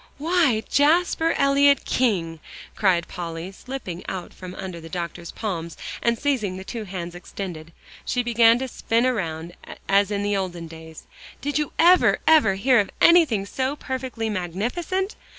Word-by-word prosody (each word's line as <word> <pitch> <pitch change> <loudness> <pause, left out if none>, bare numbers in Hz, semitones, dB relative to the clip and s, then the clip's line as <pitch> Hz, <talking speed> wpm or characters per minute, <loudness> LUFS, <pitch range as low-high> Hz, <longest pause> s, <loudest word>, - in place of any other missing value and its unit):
"Why, 305 -8 +2
Jasper 325 +2 +3
Elyot 280 0 +4
King!" 175 -10 0 0.4
cried 180 -4 +2
Polly, 170 +1 -6
slipping 195 -6 -7
out 180 -2 -6
from 185 0 -9
under 185 -3 -7
the 165 - -10
doctor's 170 0 -5
palms, 170 -7 -5 0.2
and 235 0 +1
seizing 230 -10 -1
the 190 - -7
two 220 +2 -6
hands 175 -3 -6
extended, 175 -2 -7 0.3
she 245 - -1
began 230 -1 +5
to 265 +1 -3
spin 230 -1 0
around 170 -9 -2 0.3
as 200 0 +3
in 205 -1 -2
the 205 0 0
olden 180 -3 -3
days, 160 -1 -11 0.4
"did 290 +1 -1
you 300 - -2
ever, 360 +2 +5
ever 300 -12 +5
hear 245 +5 +3
of 200 - 0
anything 310 - +5
so 260 +6 -2
perfectly 260 -5 -4
magnificent! 235 - -2
210 Hz, 150 wpm, -23 LUFS, 175-265 Hz, 0.4 s, began